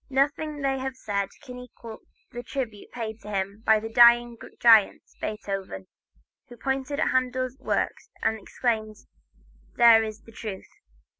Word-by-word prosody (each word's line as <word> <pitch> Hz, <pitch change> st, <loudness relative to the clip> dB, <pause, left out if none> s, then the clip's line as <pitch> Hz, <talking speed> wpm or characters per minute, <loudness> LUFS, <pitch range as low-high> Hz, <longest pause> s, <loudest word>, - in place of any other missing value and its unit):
Nothing 290 Hz, +2 st, 0 dB
they 270 Hz, -1 st, 0 dB
have 265 Hz, 0 st, -4 dB
said 200 Hz, -4 st, -2 dB
can 250 Hz, -1 st, -9 dB
equal 235 Hz, -2 st, -11 dB, 0.3 s
the 240 Hz, -, -6 dB
tribute 240 Hz, -4 st, -6 dB
paid 225 Hz, -2 st, -6 dB
him 200 Hz, 0 st, -4 dB
by 220 Hz, -1 st, +4 dB
the 225 Hz, +1 st, -7 dB
dying 240 Hz, 0 st, +6 dB, 0.2 s
giant 225 Hz, -4 st, +5 dB, 0.2 s
Beethoven, 195 Hz, -, -5 dB, 0.6 s
who 240 Hz, -, -12 dB
pointing 270 Hz, +2 st, -2 dB
to -, -, +1 dB
Handel's 255 Hz, 0 st, -1 dB
works 430 Hz, -, -2 dB
exclaimed: 220 Hz, 0 st, -1 dB, 0.8 s
"There 230 Hz, -2 st, +7 dB
is 215 Hz, -1 st, -6 dB
the 225 Hz, -, -15 dB
truth." 210 Hz, -3 st, -7 dB
235 Hz, 135 wpm, -26 LUFS, 215-260 Hz, 0.8 s, There